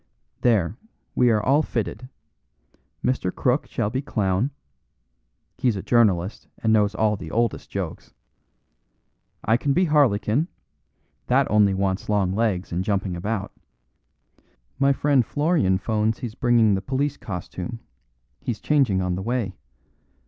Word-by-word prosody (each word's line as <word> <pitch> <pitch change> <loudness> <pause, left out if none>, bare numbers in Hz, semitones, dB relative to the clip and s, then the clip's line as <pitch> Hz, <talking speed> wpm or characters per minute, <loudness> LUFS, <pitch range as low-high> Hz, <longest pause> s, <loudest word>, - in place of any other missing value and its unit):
"There, 110 -4 +2 0.4
we 125 - +4
are 105 -2 +2
all 140 +5 +4
fitted. 120 -2 -4 1.0
Mr. 125 -8 0
Crook - - 0
shall 105 - -2
be 130 +3 -1
clown; 105 -3 0 1.1
he's 120 -4 +2
a 95 - -5
journalist 100 -5 +2
and 110 -1 +1
knows 105 -1 +3
all 105 0 +2
the 90 -5 -8
oldest 115 +4 -1
jokes. - - -5 1.3
I 110 +2 +4
can 140 +2 0
be 185 +4 +3
harlequin, 140 -2 +2 0.8
that 135 +2 +3
only 105 -2 +4
wants 95 0 -1
long 100 -3 +1
legs 100 -4 0
and 90 +2 -1
jumping 100 -2 -1
about. 100 +3 -3 1.3
My 140 0 +4
friend 140 -2 +3
Florian 145 - +1
'phones 110 +2 0
he's 120 -5 -6
bringing 120 -4 +3
the 95 - 0
police 140 +5 -1
costume; 95 +4 -6 0.6
he's 120 -3 -4
changing 125 -11 +2
on 90 0 -1
the 90 - -3
way. 115 -3 -2
110 Hz, 135 wpm, -24 LUFS, 95-125 Hz, 1.3 s, we